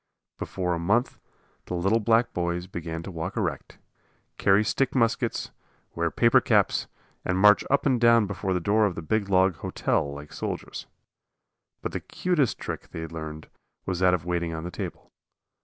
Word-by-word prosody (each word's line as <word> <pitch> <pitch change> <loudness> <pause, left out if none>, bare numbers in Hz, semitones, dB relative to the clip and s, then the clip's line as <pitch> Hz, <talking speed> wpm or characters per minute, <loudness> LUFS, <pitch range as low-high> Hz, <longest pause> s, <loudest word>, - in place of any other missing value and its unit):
Before 90 -2 -2
a 85 - -2
month 105 +9 +1 0.5
the 90 - -3
little 95 +6 +2
black 115 +2 +2
boys 85 0 -1
began 85 -2 -6
to 95 - -7
walk 90 +6 -5
erect, 85 -10 -3 0.6
carry 100 +2 +4
stick 135 +6 0
muskets, 115 -3 0 0.4
wear - - 0
paper - - +4
caps, - - +2 0.4
and 90 - 0
march 105 +1 +6
up 140 - +2
and 130 -4 +2
down 115 -2 +6
before 95 -1 -2
the - - +1
door 105 +4 +3
of 90 - -4
the 80 - -6
big 100 +4 0
log 95 -2 +3
"hotel" 70 - -1
like 75 +1 -9
soldiers. - - -5 1.0
But - - -2
the - - -3
cutest 170 - 0
trick - - -6
they 80 - -5
learned 80 -1 -7 0.4
was 90 -2 -2
that 90 -1 +4
of 85 -2 -6
waiting 85 -2 -1
on 80 - -5
the 90 - -5
table. - - -7
95 Hz, 175 wpm, -26 LUFS, 85-110 Hz, 1.0 s, march